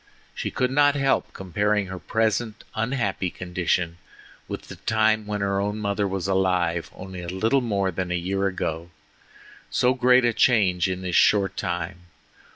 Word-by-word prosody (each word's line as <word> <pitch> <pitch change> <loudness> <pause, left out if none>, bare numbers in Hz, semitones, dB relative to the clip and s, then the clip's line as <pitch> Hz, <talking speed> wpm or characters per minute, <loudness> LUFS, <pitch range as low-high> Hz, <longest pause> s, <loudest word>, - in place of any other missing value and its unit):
She - - -3
could 125 0 0
not 145 +1 +4
help 135 -1 +1
comparing 100 +3 0
her 95 0 -7
present 110 +4 -1
unhappy 110 -5 -1
condition 90 -1 -2 0.5
with - - -5
the - - -11
time 110 -1 +1
when 105 -1 -2
her 100 0 0
own 105 +1 -2
mother 100 -1 -1
was 95 -1 -3
alive 90 -3 +1
only 95 -1 -8
a 85 - -7
little 110 +9 +1
more 100 -5 0
than 90 +1 -3
a 90 - 0
year 95 +3 0
ago—so 85 +7 -4
great 125 -1 +4
a 120 - +2
change 100 -7 +3
in 95 0 -4
this 90 -1 -2
short 100 -2 +4
time! 90 0 -4
100 Hz, 160 wpm, -24 LUFS, 90-110 Hz, 0.5 s, not